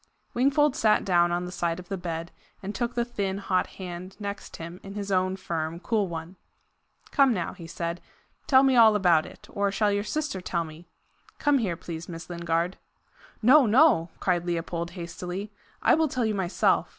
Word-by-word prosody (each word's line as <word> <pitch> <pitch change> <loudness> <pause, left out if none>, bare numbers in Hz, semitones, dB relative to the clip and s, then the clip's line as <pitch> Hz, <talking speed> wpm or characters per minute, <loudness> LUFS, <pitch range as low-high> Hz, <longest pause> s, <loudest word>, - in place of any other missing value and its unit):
Wingfold 280 +3 +3
sat 215 -1 +3
down 175 -2 +3
on 175 +1 -1
the 180 - -6
side 170 -2 -1
of 180 -1 -10
the 195 - -3
bed, 170 -2 -5 0.3
and 200 +2 -4
took 240 +1 -2
the 240 -1 +1
thin, 200 -5 -2
hot 190 -2 0
hand 185 0 -7
next 200 -1 -6
him 170 +2 -8
in 195 +1 -9
his 200 -1 -4
own 185 0 +2
firm, 165 -3 -3
cool 210 0 0
one. 170 +2 -7 0.7
"Come 275 -5 +4
now," 175 -3 -3
he 170 -3 -10
said, 170 +1 -4 0.5
"tell 265 -1 +6
me 265 -1 +4
all 225 -3 +7
about 175 -6 +3
it. - - -14
Or 200 0 0
shall 205 +1 +2
your 205 0 0
sister 270 -3 -3
tell 170 -2 -1
me? 160 +2 -12 0.5
Come 290 -2 +3
here, 185 -8 -1
please, 165 +1 -7
Miss 165 +1 -8
Lingard." 170 +1 -1 0.7
"No, 260 +2 +7
no!" 220 - +5
cried 175 -2 +1
Leopold 170 0 -3
hastily; 180 +4 -5 0.3
"I - - +5
will 320 0 +3
tell 255 -4 -1
you 220 - 0
myself. 190 -2 +1
185 Hz, 185 wpm, -27 LUFS, 170-215 Hz, 0.7 s, all